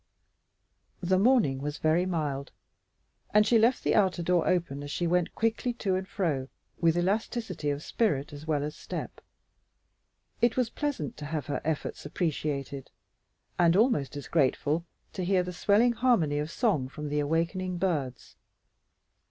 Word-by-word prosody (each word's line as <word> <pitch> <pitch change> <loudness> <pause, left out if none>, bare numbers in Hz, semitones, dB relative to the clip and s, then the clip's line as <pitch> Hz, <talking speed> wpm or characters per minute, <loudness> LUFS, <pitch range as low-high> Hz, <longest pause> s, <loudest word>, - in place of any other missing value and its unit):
The 185 +1 +3
morning 210 - +3
was 150 +1 -3
very 165 +4 +2
mild, 145 -6 -2 0.8
and 210 0 +7
she 230 +1 +4
left 235 +3 +3
the - - +2
outer 185 -4 +2
door 175 0 +2
open 170 -6 0
as 145 - -7
she 175 - -2
went 175 0 +1
quickly 230 +2 0
to 200 -5 -1
and 190 +1 -1
fro 155 -12 -1 0.3
with 165 0 +3
elasticity 195 -3 -1
of 145 +1 -2
spirit 160 - 0
as 145 +2 -9
well 150 -2 +1
as 150 +1 -4
step. - - -6 1.2
It 240 0 +3
was 245 -3 +1
pleasant 290 - -3
to 150 - -7
have 155 -1 -3
her 145 - -3
efforts 155 -1 -3
appreciated 145 -3 -3 0.7
and 170 -1 +5
almost 205 - +2
as 145 - -7
grateful 155 +2 +1 0.3
to 185 - -3
hear 185 0 +2
the 180 0 -6
swelling 215 +6 +3
harmony 225 - +2
of 150 +1 -3
song 165 - 0
from 150 +1 -6
the 150 0 0
awakening 170 +5 -1
birds. 150 -9 -2
170 Hz, 155 wpm, -28 LUFS, 145-200 Hz, 1.2 s, and